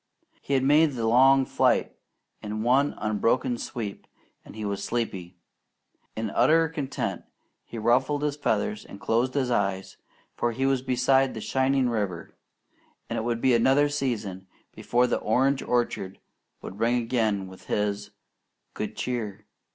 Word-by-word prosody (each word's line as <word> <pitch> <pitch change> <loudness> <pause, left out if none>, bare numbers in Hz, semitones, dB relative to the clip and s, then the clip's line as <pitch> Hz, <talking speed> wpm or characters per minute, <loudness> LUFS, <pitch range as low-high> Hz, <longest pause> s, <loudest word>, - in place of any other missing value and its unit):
He 140 - -1
had 130 - +2
made 150 +2 +4
the 115 -3 -2
long 135 +4 +5
flight - - +1 0.5
in 105 +1 -4
one 135 +4 +2
unbroken 110 +3 0
sweep, 105 -5 -6 0.4
and - - -13
he 110 -1 -5
was 100 -1 -3
sleepy. 95 -7 -3 0.8
In 110 -2 -3
utter 165 +1 +4
content 150 -4 -3 0.4
he 120 - -9
ruffled 130 +6 +1
his 145 -1 0
feathers 215 +8 -1
and 100 - -12
closed 120 +6 0
his 130 -3 0
eyes, 100 -4 -1 0.4
for 120 0 -1
he 130 +4 -1
was 135 -1 +2
beside 130 +1 +2
the - - -4
shining 130 +4 +1
river; 100 -8 -3 0.8
and - - -1
it - - -2
would 115 0 -2
be 130 -1 +4
another 135 +5 +4
season 110 -10 -3 0.3
before 125 +1 +1
the - - 0
orange 135 +5 +1
orchard 120 -6 -1 0.5
would 100 - -8
ring 115 +2 +2
again 115 -5 0
with 95 0 -14
his 105 0 -1 0.6
"Good - - -5
Cheer! 110 -5 -4
120 Hz, 150 wpm, -26 LUFS, 105-135 Hz, 0.8 s, long